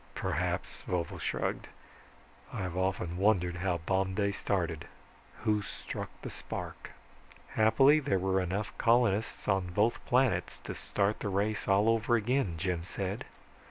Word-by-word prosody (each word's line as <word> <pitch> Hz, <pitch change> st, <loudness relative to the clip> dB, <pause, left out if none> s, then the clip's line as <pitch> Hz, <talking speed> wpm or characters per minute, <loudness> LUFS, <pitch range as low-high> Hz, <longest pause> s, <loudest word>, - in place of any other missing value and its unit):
"Perhaps," -, -, -2 dB
Vovo 90 Hz, -2 st, -2 dB
shrugged. -, -, -2 dB, 0.8 s
"I've 90 Hz, -2 st, -3 dB
often 90 Hz, -2 st, -1 dB
wondered 90 Hz, -3 st, +2 dB
how 90 Hz, -1 st, 0 dB
Bomb 95 Hz, +3 st, 0 dB
Day 100 Hz, 0 st, +1 dB
started. 90 Hz, -5 st, -2 dB, 0.6 s
Who 105 Hz, -1 st, +2 dB
struck -, -, -6 dB
the -, -, -5 dB
spark." -, -, -6 dB, 0.6 s
"Happily 135 Hz, +8 st, +5 dB
there 140 Hz, -8 st, +1 dB
were 95 Hz, +1 st, +1 dB
enough 95 Hz, +4 st, -2 dB
colonists 115 Hz, -3 st, +2 dB
on 95 Hz, -3 st, +2 dB
both 105 Hz, +6 st, +1 dB
planets 130 Hz, 0 st, +2 dB
to -, -, -5 dB
start 100 Hz, +1 st, 0 dB
the 100 Hz, -, -2 dB
race 105 Hz, +2 st, 0 dB
all 100 Hz, +2 st, +4 dB
over 115 Hz, +1 st, +3 dB
again," 115 Hz, -4 st, +1 dB
Jim 85 Hz, 0 st, -1 dB
said. 95 Hz, +3 st, -4 dB
100 Hz, 135 wpm, -31 LUFS, 90-110 Hz, 0.8 s, Happily